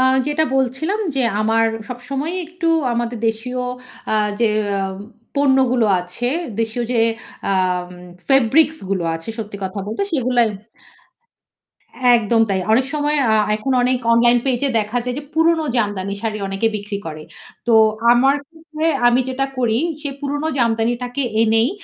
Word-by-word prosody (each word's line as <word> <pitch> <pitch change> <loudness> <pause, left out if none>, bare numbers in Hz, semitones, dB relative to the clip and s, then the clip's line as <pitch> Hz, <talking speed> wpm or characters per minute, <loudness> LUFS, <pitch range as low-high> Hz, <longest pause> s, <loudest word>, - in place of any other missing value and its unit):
আ-যেটা 265 +4 +2
বলছিলাম 265 - 0
যে 265 - +1 0.2
আমার 225 +1 +2 0.2
সবসময়ই 275 +8 -4
একটু 345 0 -3 0.2
আমাদের 235 0 -2
দেশীয় 250 +3 -3 0.5
আ - - +3 0.3
যে 230 - +4 0.9
পণ্যগুলো 265 -4 +3
আছে, 180 +8 -4 0.3
দেশীয় 225 +2 -2
যে 235 - +2 0.5
আ - - +2 0.8
ফেব্রিক্স 275 +5 +4
গুলো 185 -3 0
আছে 165 +5 -7
সত্যি 210 -2 -5
কথা 190 +2 -5
বলতে 220 - -2
সেগুলো 250 -4 +1 1.8
একদম 225 +1 +2
তাই। 190 -1 +1
অনেক 255 +3 +3
সময় 295 0 +1
আ - - +4 0.2
এখন 220 +5 -3
অনেক 255 +1 +2 0.2
অনলাইন 240 +1 +5
পেজ 250 -3 0
এ - - -1
দেখা 215 +3 -2
যায় 250 0 -3
যে 295 - -10
পুরনো 325 0 +3
জামদানি 205 -4 -1
শাড়ি 220 -2 -2
অনেকে 195 +3 0
বিক্রি 205 0 -5
করে। 155 -1 -7 0.4
তো 235 - +4 0.4
আমার 270 +4 +4
ক্ষেত্রে 320 0 -6 0.2
আমি 245 +2 +4
যেটা 270 +1 -1
করি 235 -2 +1 0.2
সে 290 - -3
পুরনো 290 +2 -2
জামদানিটাকে 240 +3 0 0.2
এনেই 225 +3 +3
245 Hz, 140 wpm, -19 LUFS, 225-275 Hz, 1.8 s, অনলাইন